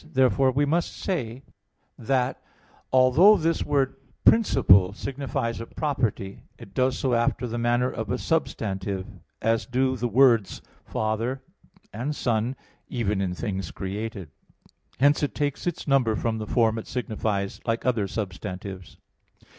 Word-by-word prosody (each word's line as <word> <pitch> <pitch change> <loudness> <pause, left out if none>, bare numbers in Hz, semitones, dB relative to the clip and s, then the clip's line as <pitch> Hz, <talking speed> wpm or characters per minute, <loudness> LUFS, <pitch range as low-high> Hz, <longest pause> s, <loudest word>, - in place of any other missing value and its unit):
Therefore, 130 0 +2
we 145 +3 +2
must 165 +4 -1
say 130 - -3 0.5
that, 130 +1 -1 0.5
although 135 +12 +6
this 165 +1 0
word 135 -2 0 0.3
"principle" 100 - +5
signifies 135 -2 -3
a 115 - -7
property, 115 -10 -2 0.2
it 95 - -13
does 130 0 +1
so 130 -2 0
after 120 +1 +1
the 120 0 -3
manner 120 +2 +1
of 110 -2 -5
a - - 0
substantive, 100 - -2 0.4
as 115 +1 +1
do 130 +1 +1
the 120 0 -1
words 115 -3 +3 0.2
"father" 115 +5 -2 0.5
and 130 +7 -3
"son" 120 +1 0 0.3
even 105 -5 -1
in 90 -2 -2
things 95 -4 -3
created. 100 -3 -5 0.7
Hence 145 +2 +4
it 145 - -1
takes 145 +2 -2
its 175 - -3
number 130 -6 +3
from 110 0 -1
the 110 - -5
form 115 -1 +2
it - - -9
signifies, 110 -5 -2
like 115 0 -1
other 115 -6 +1
substantives. 95 -3 -6
120 Hz, 140 wpm, -25 LUFS, 105-135 Hz, 0.7 s, although